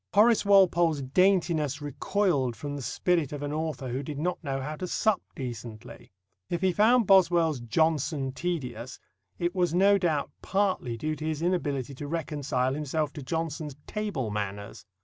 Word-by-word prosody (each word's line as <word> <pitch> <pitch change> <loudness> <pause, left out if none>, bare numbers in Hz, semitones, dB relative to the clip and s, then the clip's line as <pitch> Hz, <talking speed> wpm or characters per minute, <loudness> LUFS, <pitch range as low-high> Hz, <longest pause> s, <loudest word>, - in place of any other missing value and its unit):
Horace 220 +2 +5
Walpole's 175 -7 +4
daintiness 165 -2 +2
recoiled 145 - 0
from 145 +3 -5
the 140 - -5
spirit 165 +2 0
of 145 -1 -5
an 145 0 -3
author 155 -4 -3
who 130 +3 -2
did 145 0 -6
not 175 +4 -2
know 135 -2 -2
how 150 +3 -4
to 185 - -4
sup 215 +3 +1
decently. 120 -1 -8 0.4
If 175 - -2
he 190 - +4
found 225 +6 +4
Boswell's 175 -6 +4
Johnson 145 +2 0
tedious, 130 -6 -4 0.4
it 175 0 -1
was 175 -3 +1
no 200 +2 +5
doubt 160 -6 0
partly 190 - 0
due 155 +6 -2
to 155 - -5
his 155 0 -2
inability 145 -7 -1
to 145 +2 -7
reconcile 145 -5 -1
himself 150 +1 -2
to 150 - -7
Johnson's 155 0 -3
table 200 - -3
manners. 100 0 -5
155 Hz, 160 wpm, -28 LUFS, 135-180 Hz, 0.4 s, Horace